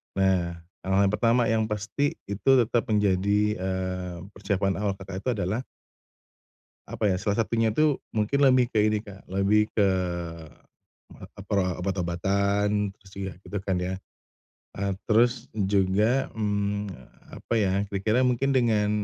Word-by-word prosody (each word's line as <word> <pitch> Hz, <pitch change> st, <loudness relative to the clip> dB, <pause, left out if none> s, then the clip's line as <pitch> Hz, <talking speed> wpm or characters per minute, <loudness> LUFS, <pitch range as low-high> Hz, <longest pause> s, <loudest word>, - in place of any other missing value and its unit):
Nah, 95 Hz, -3 st, +1 dB, 0.2 s
hal-hal 95 Hz, +1 st, +2 dB
yang 100 Hz, -, +1 dB
pertama 115 Hz, +2 st, +3 dB
yang 110 Hz, 0 st, +2 dB
pasti 105 Hz, +7 st, -1 dB
itu 100 Hz, +6 st, -2 dB, 0.2 s
tetap 120 Hz, +3 st, 0 dB
menjadi, 100 Hz, -1 st, +2 dB, 0.2 s
eee, 95 Hz, -1 st, -3 dB, 0.2 s
persiapan 100 Hz, -1 st, -1 dB
awal 100 Hz, -1 st, 0 dB
Kakak 95 Hz, 0 st, -7 dB
itu 130 Hz, -, -2 dB
adalah 100 Hz, +6 st, -1 dB, 1.3 s
Apa 105 Hz, -, 0 dB
ya, 95 Hz, -, +1 dB
salah 105 Hz, +3 st, +1 dB
satunya 115 Hz, -1 st, 0 dB
tuh 150 Hz, +1 st, +3 dB, 0.2 s
mungkin 110 Hz, +6 st, +1 dB
lebih 130 Hz, -2 st, +4 dB
ke 110 Hz, -, 0 dB
ini 105 Hz, -1 st, 0 dB
Kak, 100 Hz, -3 st, -13 dB
lebih 100 Hz, +3 st, +2 dB
ke, 105 Hz, -, +3 dB, 1.4 s
eee -, -, -10 dB
eee, 100 Hz, -, -13 dB
pro 100 Hz, -3 st, +2 dB, 0.2 s
obat-obatan, 100 Hz, +3 st, 0 dB
terus 95 Hz, -1 st, -20 dB
juga 95 Hz, -1 st, -4 dB
gitu 100 Hz, -, -5 dB
kan 95 Hz, 0 st, -2 dB
ya. 95 Hz, +1 st, -3 dB, 0.8 s
Eee, 100 Hz, 0 st, -1 dB, 0.2 s
terus 120 Hz, +2 st, +3 dB
juga, 100 Hz, +5 st, +2 dB
mmm, 105 Hz, -1 st, -1 dB, 0.6 s
apa -, -, -4 dB
ya, 100 Hz, -4 st, +2 dB, 0.2 s
kira-kira 105 Hz, +5 st, +1 dB
mungkin 130 Hz, +2 st, +2 dB
dengan 110 Hz, -5 st, +2 dB
100 Hz, 140 wpm, -26 LUFS, 95-110 Hz, 1.4 s, lebih